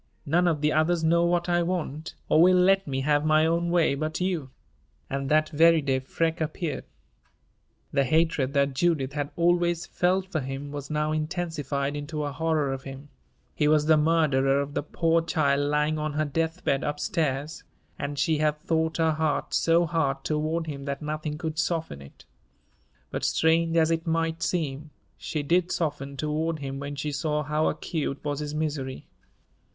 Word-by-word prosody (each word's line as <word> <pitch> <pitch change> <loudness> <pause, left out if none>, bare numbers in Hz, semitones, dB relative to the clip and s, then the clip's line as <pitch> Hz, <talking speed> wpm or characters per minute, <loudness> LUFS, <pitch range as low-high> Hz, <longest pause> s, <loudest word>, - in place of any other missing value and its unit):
None 175 +4 +2
of 155 -4 +1
the 150 0 +2
others 160 +2 +2
know 170 +1 +3
what 175 0 +1
I 175 0 +2
want, 165 -3 -3
or 155 - +4
will 185 +2 +6
let 195 +1 +4
me 135 -1 -2
have 145 +1 +2
my 155 0 +4
own 170 +1 +1
way, 170 -4 +3
but 155 +3 -3
you." 180 -7 -1 0.6
And 135 0 -2
that 155 0 +3
very 165 +1 +5
day 135 -3 0
Freke 160 +5 -2
appeared. 160 0 -3 1.1
The 140 -1 +3
hatred 155 -1 +1
that 140 -1 +2
Judith 140 -2 +1
had 145 -1 -2
always 175 0 +2
felt 185 +1 +1
for 160 - 0
him 135 +1 -5
was 145 -1 -6
now 150 0 0
intensified 155 -3 -2
into 150 +1 -4
a 145 - -2
horror 155 -2 0
of 135 - -5
him 135 +2 -10 0.4
he 150 - +1
was 150 0 +3
the 160 0 +5
murderer 150 -4 +3
of 140 0 -3
the - - -1
poor 165 +3 +1
child 145 -3 +1
lying 150 +1 +1
on 150 0 -2
her 155 +1 0
death 165 +4 -2
bed 135 - +1
up 150 0 -2
stairs 155 -4 -2 0.4
and 145 0 -4
she 155 +1 +1
had 150 -1 +1
thought 160 +1 -1
her 160 -1 +3
heart 155 -1 -1
so 165 +1 +3
hard 145 -5 -1
toward 155 +2 -1
him 140 -3 -6
that 140 +1 -4
nothing 150 0 -3
could 160 -1 -4
soften 160 - -2
it; 70 - -15 0.9
but, - - -4
strange 165 +1 +2
as 160 0 +4
it 165 0 -1
might 165 0 0
seem, 155 -4 -2 0.3
she 150 -2 -4
did 175 +4 +1
soften 140 -4 -3
toward 155 +3 -1
him 135 -2 -5
when 145 +1 -5
she 150 +2 -3
saw 150 +1 -1
how 150 +2 0
acute 145 -4 -3
was 145 -1 -2
his 150 0 -4
misery. 145 -4 -3
155 Hz, 180 wpm, -26 LUFS, 145-165 Hz, 1.1 s, will